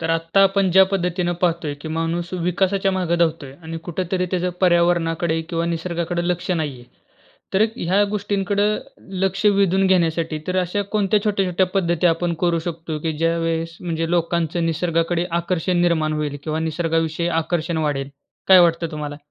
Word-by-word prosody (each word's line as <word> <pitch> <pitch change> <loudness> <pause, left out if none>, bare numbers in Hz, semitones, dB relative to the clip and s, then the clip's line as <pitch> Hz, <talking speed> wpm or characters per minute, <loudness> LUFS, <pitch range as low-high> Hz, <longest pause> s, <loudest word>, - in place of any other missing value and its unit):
तर 165 0 -1
आत्ता, 165 +3 +1
आपण 195 -1 +3
ज्या 190 +2 +7
पद्धतीने 180 -2 -1
पाहतोय. 165 -4 0
की 145 +2 -9
माणूस 165 +2 -2
विकासाच्या 190 +2 +1
मागं 175 -2 0
धावतोय 160 -5 0
आणि 165 0 -6
कुठेतरी 180 +1 -1
त्याचं 180 -1 0
पर्यावरणाकडे, 170 -2 +2
किंवा 165 -1 -1
निसर्गाकडे 170 +1 -2
लक्ष 180 +1 -2
नाहीये. 150 -8 -2 0.7
तर 190 - +3
एक 220 +1 +3
ह्या 190 0 +2
गोष्टींकडं 205 0 0 0.5
लक्ष 195 +2 -1
वेधून 195 -2 +3
घेण्यासाठी, 165 -3 +1
तर 185 0 -1
अशा 185 +3 -1
कोणत्या 210 -1 +2
छोट्या-छोट्या 190 -3 +1
पद्धती 175 -3 +1
आपण 170 +1 +1
करू 170 -2 +2
शकतो 165 -2 -4
की 160 +1 -1
ज्यावेळेस 165 0 -1
म्हणजे 165 -1 -2
लोकांचं 170 -1 0
निसर्गाकडे 165 +1 0 0.2
आकर्षण 175 0 0
निर्माण 160 -3 +1
होईल, 145 -1 -3
किंवा 155 0 -2
निसर्गाविषयी 165 +1 -1
आकर्षण 165 0 -2
वाढेल. 145 -3 -2 0.4
काय 190 -1 +9
वाटतं 165 -1 +2
तुम्हाला? 150 -1 -5
170 Hz, 150 wpm, -21 LUFS, 165-185 Hz, 0.7 s, काय